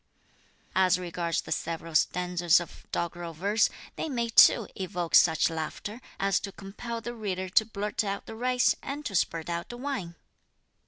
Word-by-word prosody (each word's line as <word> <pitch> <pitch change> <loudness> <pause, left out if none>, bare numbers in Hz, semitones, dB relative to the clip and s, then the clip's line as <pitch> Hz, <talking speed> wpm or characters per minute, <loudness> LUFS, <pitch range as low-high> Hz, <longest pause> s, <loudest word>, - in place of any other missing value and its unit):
"As 185 -1 +4
regards 175 -2 -2
the - - -10
several 165 0 -3
stanzas 175 +1 +3
of 175 - -10
doggerel 170 0 -3
verse, 200 +7 +2 0.3
they 320 - -3
may 235 -4 -1
too 225 -1 +7
evoke 180 -3 -4
such 160 -2 +6
laughter 165 +8 -5 0.2
as 195 0 +2
to 195 - -6
compel 230 +5 -7
the 240 - -5
reader 190 -5 -3
to 220 +3 +4
blurt 210 0 -2
out 200 -1 -3
the - - -8
rice, 250 +1 +2
and 290 +2 -5
to 210 - -3
spurt 165 -3 0
out 170 0 -3
the 240 - -7
wine. 245 -11 -4
190 Hz, 165 wpm, -28 LUFS, 170-225 Hz, 0.3 s, too